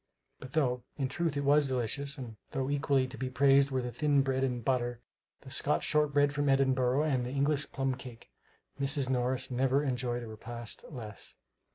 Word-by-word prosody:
But 130 0 -10
though, 125 -5 +1 0.2
in 135 -3 -1
truth 165 0 -1
it 140 - -1
was 145 +1 +4
delicious, 135 +3 -1
and 120 -5 -7
though 135 +1 -2
equally 140 -2 +2
to 130 +1 -9
be 130 0 -2
praised 140 +1 +4
were 130 -2 -1
the 125 - -4
thin 140 +3 +2
bread 135 0 0
and 125 -3 -2
butter, 120 -2 0 0.4
the - - -11
Scotch - - +2
shortbread 145 -1 +2
from 145 -1 0
Edinburgh, 135 0 +3
and 135 -5 +1
the 120 - -4
English 140 +2 0
plum 135 -1 -1
cake, 125 -2 -11 0.5
Mrs. 140 -1 +1
Morris 130 +1 0
never 135 +3 +2
enjoyed 125 -3 -2
a - - -7
repast 115 +1 -6
less. 110 -9 -9
130 Hz, 185 wpm, -31 LUFS, 125-140 Hz, 0.5 s, was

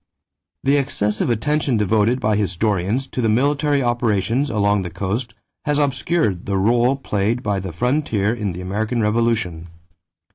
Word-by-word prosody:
= - - -62
The 140 +2 +3
excessive 115 -7 0
attention 135 +2 +1
devoted 110 +4 +2
by 110 -4 +1
historians 100 +4 0
to 125 - -3
the 115 - +1
military 145 +4 +2
operations 120 +2 0
along 100 -2 +1
the 90 - -4
coast 110 +6 -3 0.3
has 150 -1 +1
obscured 135 - 0
the 100 - 0
rôle 120 +7 +2
played 105 +5 -1
by 100 -2 0
the 95 -1 -5
frontier 115 - 0
in 105 -5 -3
the 90 - -7
American 110 +6 -2
Revolution. 105 -6 0
110 Hz, 150 wpm, -20 LUFS, 100-130 Hz, 0.3 s, The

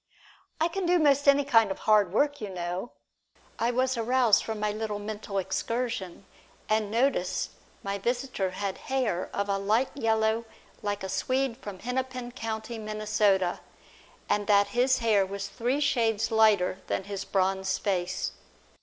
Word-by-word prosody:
"I 325 - +3
can 360 +1 -3
do 355 +1 +4
most 285 -3 +3
any 280 0 +5
kind 225 -6 +4
of 195 - -3
hard 210 -4 +3
work, 285 +6 +1
you 210 - -4
know" 180 +4 -4 0.7
I 235 - +2
was 255 +2 +1
aroused 235 -2 +3
from 220 -1 -4
my 210 0 0
little 215 0 -3
mental 205 -1 -5
excursion, 200 0 -2 0.4
and 215 -1 +1
noticed 230 -4 0
that - - -29
my 200 0 -2
visitor 240 -3 -1
had 190 +1 -4
hair 250 -9 0
of 200 0 -2
a 200 -1 0
light 215 +6 +1
yellow 225 -3 +1 0.4
like 205 -1 -3
a - - -2
Swede 255 +5 -1
from 205 -7 -8
Hennepin 250 +2 -3
County, 225 -1 -5
Minnesota, 210 -3 +1 0.7
and 205 -1 0
that 205 -1 +4
his 255 +2 +3
hair 210 -3 +4
was 200 +1 -4
three 245 +7 -1
shades 230 -7 +1
lighter 210 -4 +3
than - - -1
his 200 0 -5
bronzed 190 0 0
face. 195 - -1
220 Hz, 155 wpm, -28 LUFS, 200-250 Hz, 0.7 s, any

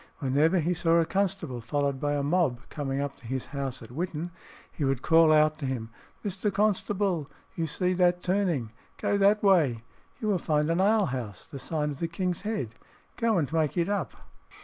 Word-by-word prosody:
Whenever 150 +6 +2
he 170 +1 +1
saw 165 -1 +2
a 165 - +3
constable, 185 -10 -1
followed 140 +3 -1
by 145 +1 0
a 145 -1 0
mob, 145 -5 +1
coming 140 -2 -3
up 140 -1 -3
to 115 - -13
his 130 +1 -2
house 135 -3 -3
at 115 - -12
Whitton, 170 +3 -3 0.4
he 155 - -4
would 135 -2 0
call 165 -1 +6
out 155 0 +4
to 140 - -3
him, 115 -4 -4 0.3
"Mr. 200 +1 -1
Constable, 200 -5 0 0.3
you 165 -3 -1
see 180 +2 0
that 180 -1 +2
turning; 180 - 0 0.3
go - - 0
that 205 +2 +4
way; 165 - +4 0.4
you 215 - -3
will 200 -4 +2
find 150 0 +1
an 170 +3 +2
ale 210 +1 +4
house, 120 - -5
the 140 -4 -9
sign 150 +1 -2
of 140 - -8
the 170 - -1
King's 180 +1 -2
Head: 200 - -3 0.4
go 230 -3 +2
and 155 -2 -1
make 160 0 +1
it 170 +2 +1
up." 205 0 -1
160 Hz, 195 wpm, -28 LUFS, 140-185 Hz, 0.4 s, call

